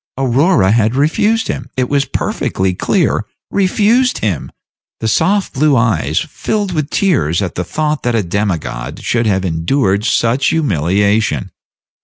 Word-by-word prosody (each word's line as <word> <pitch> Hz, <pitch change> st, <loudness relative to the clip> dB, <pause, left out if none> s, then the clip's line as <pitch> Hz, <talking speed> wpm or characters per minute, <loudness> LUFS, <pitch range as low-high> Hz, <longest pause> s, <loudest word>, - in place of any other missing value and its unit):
Aurora 130 Hz, -, +2 dB
had 110 Hz, +1 st, +2 dB
refused 205 Hz, +11 st, +1 dB
him -, -, -4 dB
it 130 Hz, -1 st, +1 dB
was 140 Hz, 0 st, +1 dB
perfectly 95 Hz, -7 st, -2 dB
clear -, -, 0 dB, 0.3 s
refused 215 Hz, +6 st, +2 dB
him! 100 Hz, -8 st, -2 dB, 0.5 s
The 110 Hz, -, -2 dB
soft 195 Hz, -, +1 dB
blue 145 Hz, 0 st, +2 dB
eyes 115 Hz, -2 st, +1 dB
filled 205 Hz, -3 st, -3 dB
with 150 Hz, -3 st, -2 dB
tears 85 Hz, -, +1 dB
at 95 Hz, -4 st, -2 dB
the 90 Hz, -, -3 dB
thought 150 Hz, -, -2 dB
that 120 Hz, -1 st, 0 dB
a 110 Hz, -, +1 dB
demigod 90 Hz, -, -3 dB
should 120 Hz, -1 st, 0 dB
have 95 Hz, -2 st, +1 dB
endured 95 Hz, -, 0 dB
such 120 Hz, +4 st, +1 dB
humiliation. 100 Hz, -, +1 dB
120 Hz, 140 wpm, -15 LUFS, 95-155 Hz, 0.5 s, Aurora